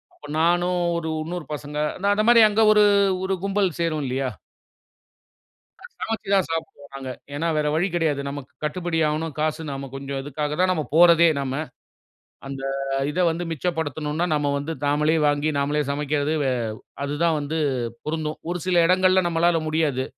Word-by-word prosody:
அப்ப -, -, -15 dB
நானும் 175 Hz, +2 st, +2 dB, 0.2 s
ஒரு 160 Hz, -1 st, -3 dB
இன்னொரு 170 Hz, 0 st, -5 dB
பசங்க 150 Hz, 0 st, -6 dB, 0.2 s
அந்த 200 Hz, -, -2 dB
அந்த 210 Hz, +1 st, +1 dB
மாரி 235 Hz, -1 st, +7 dB
அங்க 210 Hz, +1 st, +1 dB
ஒரு 210 Hz, 0 st, +5 dB, 0.4 s
ஒரு 190 Hz, 0 st, 0 dB
கும்பல் 195 Hz, -1 st, +1 dB
சேரும் 160 Hz, -3 st, 0 dB
இல்லையா? 130 Hz, +1 st, -1 dB, 1.7 s
சமைச்சு 225 Hz, -3 st, -3 dB
தான் 190 Hz, -, +2 dB
சாப்பிடுவோம் 150 Hz, -3 st, -5 dB
நாங்க. 135 Hz, -1 st, -6 dB, 0.3 s
ஏனா 160 Hz, +3 st, -1 dB
வேற 150 Hz, 0 st, +1 dB
வழி 175 Hz, +5 st, +2 dB
கடையாது. 160 Hz, -5 st, 0 dB
நமக்கு 140 Hz, -2 st, -8 dB
கட்டுபடி 165 Hz, +2 st, -1 dB
ஆவணும். 155 Hz, +1 st, -2 dB
காசு 155 Hz, +1 st, 0 dB
நம்ம 135 Hz, 0 st, -6 dB
கொஞ்சம் 135 Hz, 0 st, -4 dB
இதுக்காக 150 Hz, +1 st, -3 dB
தான் 185 Hz, 0 st, +3 dB
நம்ம 155 Hz, -4 st, -2 dB
போறதே 170 Hz, 0 st, +7 dB
நம்ம. 135 Hz, -1 st, -3 dB, 0.9 s
அந்த 135 Hz, 0 st, -6 dB, 0.5 s
இத 180 Hz, -, -2 dB
வந்து 170 Hz, +2 st, -3 dB
மிச்சப்படுத்தணுன்னா 160 Hz, -1 st, -2 dB
நம்ம 145 Hz, -1 st, 0 dB
வந்து 145 Hz, +3 st, -4 dB
நாமளே 150 Hz, +2 st, +2 dB
வாங்கி 145 Hz, +1 st, +1 dB
நாமளே 145 Hz, +2 st, 0 dB
சமைக்கிறது 145 Hz, +1 st, -1 dB
வே 135 Hz, -, +1 dB, 0.5 s
அது 140 Hz, +1 st, -3 dB
தான் 165 Hz, -2 st, +3 dB
வந்து 150 Hz, +3 st, -3 dB, 0.5 s
பொருந்தும். 155 Hz, 0 st, -3 dB
ஒரு 180 Hz, -, -2 dB
சில 175 Hz, -2 st, +4 dB
இடங்கள்ல 185 Hz, 0 st, +4 dB
நம்மளால 170 Hz, 0 st, +2 dB
முடியாது. 155 Hz, -5 st, 0 dB
155 Hz, 160 wpm, -23 LUFS, 145-175 Hz, 1.7 s, மாரி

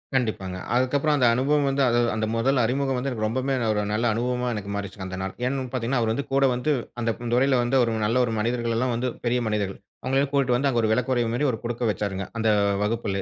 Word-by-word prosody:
கண்டிப்பாங்க. 100 Hz, -7 st, -1 dB, 0.2 s
அதுக்கப்புறம் 140 Hz, +4 st, +2 dB
அந்த 125 Hz, -, +3 dB
அனுபவம் 140 Hz, +3 st, +2 dB
வந்து 135 Hz, 0 st, 0 dB, 0.3 s
அந்த 110 Hz, -, 0 dB
முதல் 130 Hz, +4 st, +2 dB
அறிமுகம் 135 Hz, +2 st, 0 dB
வந்து 130 Hz, +2 st, -2 dB
எனக்கு 110 Hz, -3 st, -2 dB
ரொம்பமே 130 Hz, +4 st, -1 dB, 0.2 s
ஒரு 105 Hz, -1 st, 0 dB
நல்ல 115 Hz, +3 st, 0 dB
அனுபவமா 125 Hz, +2 st, -1 dB
எனக்கு 100 Hz, -1 st, -5 dB
மாறிச்சுங்க 100 Hz, -1 st, -5 dB
அந்த 95 Hz, 0 st, -6 dB
நாள். 95 Hz, 0 st, -4 dB
ஏன்னு 135 Hz, +1 st, -1 dB
பார்த்தீங்கன்னா 125 Hz, 0 st, -1 dB
அவர் 110 Hz, -, +1 dB
வந்து 140 Hz, +4 st, -3 dB
கூட 135 Hz, 0 st, +4 dB
வந்து 140 Hz, +5 st, 0 dB, 0.3 s
அந்த 115 Hz, -, +1 dB, 0.2 s
துறையில 130 Hz, +2 st, +3 dB
வந்து 125 Hz, +3 st, +1 dB
ஒரு 115 Hz, -, 0 dB
நல்ல 115 Hz, +4 st, +1 dB
ஒரு 115 Hz, -, -3 dB
மனிதர்கள்ல்லாம் 120 Hz, +1 st, 0 dB
வந்து 125 Hz, +2 st, -1 dB, 0.2 s
பெரிய 125 Hz, +1 st, +2 dB
மனிதர்கள். 105 Hz, -3 st, -2 dB, 0.2 s
அவங்களை 135 Hz, +1 st, 0 dB
எல்லாம் 140 Hz, 0 st, 0 dB
கூட்டிட்டு 130 Hz, -3 st, +2 dB
வந்து 140 Hz, +3 st, +1 dB
அங்கே 120 Hz, -3 st, +1 dB
ஒரு 110 Hz, -, +2 dB
விளக்குறைவு 120 Hz, 0 st, +1 dB
மாதிரி 145 Hz, +5 st, +1 dB
ஒரு 115 Hz, -, -4 dB
கொடுக்க 120 Hz, +1 st, -3 dB
வச்சாருங்க 100 Hz, 0 st, -3 dB
அந்த 115 Hz, -1 st, 0 dB, 0.4 s
வகுப்பிலே. 105 Hz, -2 st, -1 dB
120 Hz, 215 wpm, -25 LUFS, 110-130 Hz, 0.4 s, கூட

